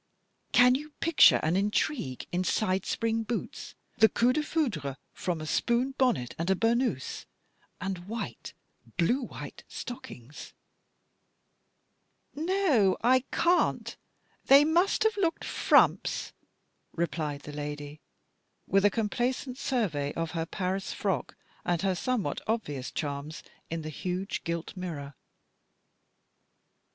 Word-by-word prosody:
" - - -46
Can 250 0 +6
you 295 +4 -3
picture 330 -2 +6
an 160 +3 +2
intrigue 200 - 0
in 180 +1 0
side 185 0 0
spring 225 0 0
boots, 225 +1 -5 0.2
the 220 0 +7
coup 245 +2 +3
defoucbre 250 - -1 0.2
from 175 -3 -2
a 155 - -5
spoon 240 - +1
bonnet 245 - +1
and 170 +2 -1
a 190 - +4
burnous, 230 - 0 0.5
and 190 -1 -3
white, 210 - -5 0.4
blue 240 +11 +2
white 245 - -8
stockings? 145 - -8 0.9
" - - -47
"No, 310 - +2
I 255 +2 +4
can't. 350 +1 +2 0.5
They 280 +2 +8
must 345 +5 +3
have 440 -1 +2
looked 340 -5 0
frumps," - - +3 0.6
replied 155 -4 -2
the 150 - -9
lady, 145 0 -6 0.6
with 195 +1 +3
a 205 - +6
complacent 245 +5 -2
survey 170 - -1
of 165 -1 -2
her 165 -1 -2
Paris 190 +1 -2
frock 195 -3 -2 0.3
and 175 -1 0
her 190 -1 +2
somewhat 200 - -1
obvious 150 - -2
charms 145 +1 -4 0.3
in 165 -1 -3
the 155 - -5
huge 180 +4 -3
gilt 170 +2 -4
mirror. 155 -7 -5
195 Hz, 120 wpm, -29 LUFS, 160-250 Hz, 0.9 s, They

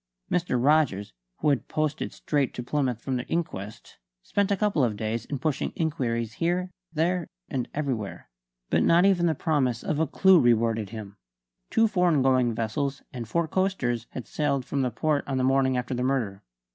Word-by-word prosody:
Mr. 175 -7 +1
Rogers, 125 - +2 0.3
who - - +3
had 140 -3 0
posted 155 -1 -1
straight 145 -4 -1
to 125 - -4
Plymouth 125 -3 -1
from 130 +1 -2
the 125 - -5
inquest, 110 - -4 0.2
spent 200 -1 0
a 200 - +1
couple 200 -8 +2
of 110 -4 0
days 110 +1 -2
in 140 - -3
pushing 145 +1 -1
inquiries 120 -8 -1
here, 180 +2 0 0.2
there 170 +2 0 0.2
and 130 -3 -2
everywhere. 130 -9 -3 0.4
But - - +3
not 170 +2 +5
even 180 -3 +4
the 160 - +1
promise 130 -7 0
of 155 - -1
a 160 - +2
clue 190 +4 +5
rewarded 115 -4 +2
him. 105 -2 -8 0.5
Two 225 - +4
foreign 180 -9 +2
going 130 -3 +3
vessels 135 +5 -2
and 120 -3 -5
four 170 +5 +1
coasters 140 - 0
had 125 - -7
sailed 140 -4 -1
from 140 +1 -1
the 130 - +1
port 145 +5 0
on 135 -2 -1
the 130 - +1
morning 130 0 +3
after 125 +1 -2
the 125 - -2
murder. 125 -7 -1
135 Hz, 185 wpm, -26 LUFS, 120-160 Hz, 0.5 s, not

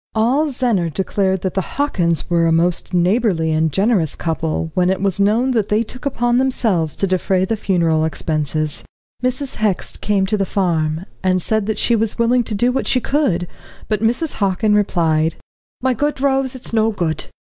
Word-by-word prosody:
All 255 +8 +2
Zennor 240 - 0
declared 190 +1 -1
that 190 -2 -2
the 190 - 0 0.2
Hockins 175 - 0
were 170 -1 +2
a - - +2
most 170 +2 +1
neighbourly 180 -2 +1
and 160 0 +1
generous 195 - +1
couple, 160 0 -2
when 180 0 +2
it 190 - 0
was 195 -1 -1
known 220 +6 +2
that 220 -5 0
they 215 +2 +2
took 255 +5 -6
upon 240 -2 +1
themselves 220 - 0
to - - 0
defray 185 0 +1
the 225 - -1
funeral 170 -6 +1
expenses. 155 -1 -1 0.4
Mrs. 255 +2 -2
Hext 210 -4 -1
came 200 -2 +1
to 210 +2 0
the 195 - +1
farm, 165 -4 0 0.2
and 185 -1 +2
said 215 +3 0
that 220 - -1
she 235 - +2
was 220 -1 0
willing 240 +1 +2
to 215 - -3
do 240 +4 +2
what 265 - -2
she 255 - +3
could, 230 - 0 0.4
but 215 -2 -1
Mrs. 240 +8 0
Hockin 200 +2 +2
replied: 165 -6 +1 0.5
"My 260 -1 +2
good 290 +4 -1
Rose, 270 -1 +1
it's 255 -2 -5
no 220 0 +3
good. 170 -7 -2
200 Hz, 185 wpm, -19 LUFS, 170-235 Hz, 0.5 s, she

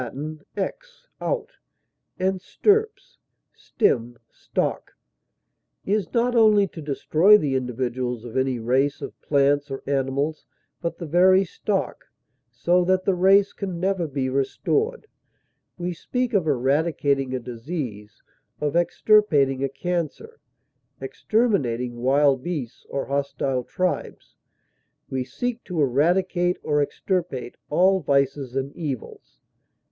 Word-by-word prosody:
ex, - - -5
out, 485 -1 -2 0.7
and 185 0 0
stirps, 435 - 0 0.3
stem, 120 0 0
stock) - - -3 0.9
is 205 0 0
not 245 +1 +1
only 215 -3 +5
to 165 - -10
destroy 155 +7 +4
the 145 -9 -1
individuals 125 -1 -2
of 115 - -9
any 130 -1 +1
race 130 +5 +1
of - - -8
plants 145 0 +2
or 135 - -6
animals, 140 +3 -1 0.3
but 170 -1 -3
the 170 - -6
very 185 +4 +5
stock, 195 +2 -3 0.4
so 180 +1 +2
that 185 +1 +1
the 195 - +3
race 195 +2 +4
can 185 -4 -5
never 185 -2 0
be 135 -2 -2
restored; 425 - -1 0.7
we 175 0 -3
speak 250 +8 -2
of 185 -6 +2
eradicating 140 -1 +1
a - - -2
disease, 115 - -6 0.4
of 150 +1 -1
extirpating 165 -7 +3
a 135 - 0
cancer, 180 - -4 0.6
exterminating 125 - 0
wild 135 +1 +3
beasts 145 -7 -5
or 140 - -2
hostile 140 -2 -1
tribes; 185 +8 -3 0.8
we 130 -1 -1
seek 240 - -4
to 180 -4 -4
eradicate 175 +6 +2
or 150 -1 +1
extirpate 145 -5 -2 0.2
all 190 +5 +4
vices 140 -3 0
and 135 +1 -3
evils. 140 -8 -6
150 Hz, 115 wpm, -24 LUFS, 135-190 Hz, 0.9 s, only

